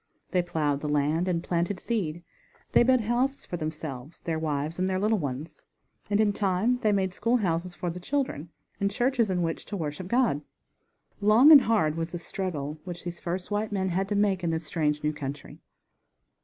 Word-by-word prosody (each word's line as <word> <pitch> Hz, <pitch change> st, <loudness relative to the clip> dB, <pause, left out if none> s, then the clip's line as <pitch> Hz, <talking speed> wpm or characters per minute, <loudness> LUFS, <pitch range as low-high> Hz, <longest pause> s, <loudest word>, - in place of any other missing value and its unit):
They 180 Hz, -, +3 dB
plowed 150 Hz, -5 st, -1 dB
the 150 Hz, -, -4 dB
land 150 Hz, +4 st, +1 dB
and 170 Hz, -2 st, 0 dB
planted 175 Hz, +2 st, -1 dB
seed; 175 Hz, -8 st, -2 dB, 0.5 s
they -, -, +6 dB
built 255 Hz, 0 st, +4 dB
houses 245 Hz, +5 st, 0 dB
for -, -, -5 dB
themselves, 155 Hz, -3 st, -6 dB
their 160 Hz, -2 st, -2 dB
wives, 155 Hz, +1 st, -2 dB
and 185 Hz, -, +1 dB
little 205 Hz, +3 st, +1 dB
ones, 140 Hz, +1 st, -5 dB, 0.5 s
and 205 Hz, 0 st, +2 dB
in 210 Hz, -2 st, +3 dB
time 205 Hz, +5 st, +1 dB
they 215 Hz, -3 st, +2 dB
made 190 Hz, -2 st, +1 dB
school 230 Hz, +5 st, +2 dB
houses 175 Hz, -3 st, -1 dB
for 175 Hz, -, -3 dB
the 180 Hz, -, -7 dB
children, 185 Hz, -, -2 dB, 0.3 s
and 200 Hz, -, +1 dB
churches 240 Hz, +1 st, +1 dB
in 180 Hz, -2 st, 0 dB
which 165 Hz, -1 st, -2 dB
to 205 Hz, -, -5 dB
worship 155 Hz, +2 st, -4 dB
God. 235 Hz, -, +2 dB, 0.8 s
Long 215 Hz, +8 st, +7 dB
and 290 Hz, -3 st, +11 dB
hard 205 Hz, -10 st, +1 dB
was 165 Hz, 0 st, -2 dB
the -, -, -2 dB
struggle 160 Hz, -4 st, -4 dB
which 175 Hz, -2 st, -7 dB
these 175 Hz, 0 st, -6 dB
first 180 Hz, +3 st, -4 dB
white 210 Hz, +1 st, -1 dB
men 190 Hz, -2 st, 0 dB
had 190 Hz, +2 st, -1 dB
to 205 Hz, -, 0 dB
make 200 Hz, -3 st, +2 dB
in 170 Hz, -, +1 dB
this 160 Hz, 0 st, -2 dB
strange, 150 Hz, -2 st, -1 dB
new 150 Hz, 0 st, +1 dB
country. 140 Hz, -1 st, -7 dB
180 Hz, 195 wpm, -27 LUFS, 160-210 Hz, 0.8 s, and